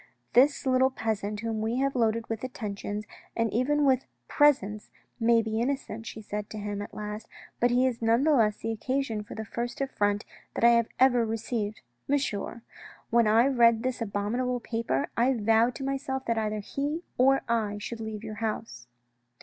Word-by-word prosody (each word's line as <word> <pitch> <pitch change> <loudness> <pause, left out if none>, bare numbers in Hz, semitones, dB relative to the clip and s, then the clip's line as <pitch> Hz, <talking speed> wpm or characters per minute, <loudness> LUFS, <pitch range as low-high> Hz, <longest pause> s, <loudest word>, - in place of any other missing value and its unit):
" - - -43
This 280 +4 +4
little 260 0 +4
peasant 215 -4 -3
whom 225 -1 -2
we 225 +2 -1
have 275 +1 0
loaded 230 -1 +1
with 225 0 -4
attentions, 210 -4 -4 0.3
and 230 -1 +1
even 290 +5 +2
with 265 -1 +2 0.2
presents, 215 -9 +2 0.3
may 230 0 +4
be 220 0 -1
innocent," 240 -4 -3
she 220 - -7
said 210 0 -5
to 215 - -7
him 205 -1 -4
at 205 - -8
last, 210 +1 -6 0.2
" - - -22
but 245 - +4
he 250 +2 +3
is 245 -3 -1
none 230 +3 +3
the 310 0 +4
less 215 -5 +3
the 225 - -3
occasion 245 0 -1
of 210 - -8
the 220 - -4
first 240 +5 -4
affront 205 -6 0 0.3
that - - -2
I 235 - +8
have 235 -1 +3
ever 250 -2 +5
received. 220 - -3 0.3
Monsieur, 240 -5 -1 0.5
when 235 -1 +4
I 225 +3 +5
read 235 -4 +4
this 255 -1 -2
abominable 230 +4 -1
paper, 225 - -1
I 255 +3 +3
vowed 225 +2 +3
to - - -6
myself 270 -1 -2
that 230 - +1
either 215 -1 -1
he 290 - -3 0.2
or 270 +2 +4
I 220 -3 0
should 225 +3 -6
leave 220 -1 -5
your 215 -1 -6
house." 215 - -4
230 Hz, 190 wpm, -28 LUFS, 215-255 Hz, 0.5 s, I